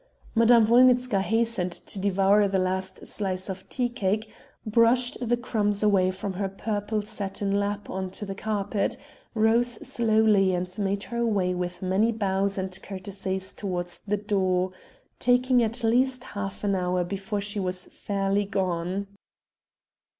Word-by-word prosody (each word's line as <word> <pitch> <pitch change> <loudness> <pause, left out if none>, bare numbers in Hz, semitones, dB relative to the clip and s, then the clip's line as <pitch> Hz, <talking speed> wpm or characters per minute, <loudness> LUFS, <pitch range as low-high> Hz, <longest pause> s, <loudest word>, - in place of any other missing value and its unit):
Madame 230 0 +6
Wolnitzka 250 -2 +4
hastened 225 -3 0
to 195 - -3
devour 200 +1 +3
the 195 0 0
last 185 0 -2
slice 190 -2 -3
of 190 0 -7
tea 250 -2 +1
cake, 215 -2 -2 0.3
brushed 230 +3 +3
the 240 0 +1
crumbs 210 -4 -1
away 195 -3 +4
from 190 +1 -4
her 195 +1 -2
purple 210 +1 -2
satin 200 -1 -3
lap 205 0 -1
on 190 0 -4
to 200 +3 -5
the 195 - -5
carpet, 205 -1 -1 0.4
rose 230 +2 +3
slowly, 215 -4 +3
and 180 +1 -3
made 200 0 -1
her 235 -1 -3
way 195 -5 +1
with 180 +1 -4
many 195 +5 +2
bows 200 -2 0
and 190 -1 -4
courtesies 190 -1 -5
towards 175 -3 -4
the 210 +1 +1
door, 190 -3 0 0.5
taking 250 0 +3
at 230 +2 0
least 250 +2 +2
half 205 -3 -6
an 200 -1 +1
hour 180 -1 0
before 195 +3 -3
she 205 +1 -2
was 180 -1 -2
fairly 200 0 -1
gone. 185 -1 -2
200 Hz, 145 wpm, -26 LUFS, 190-220 Hz, 0.5 s, Madame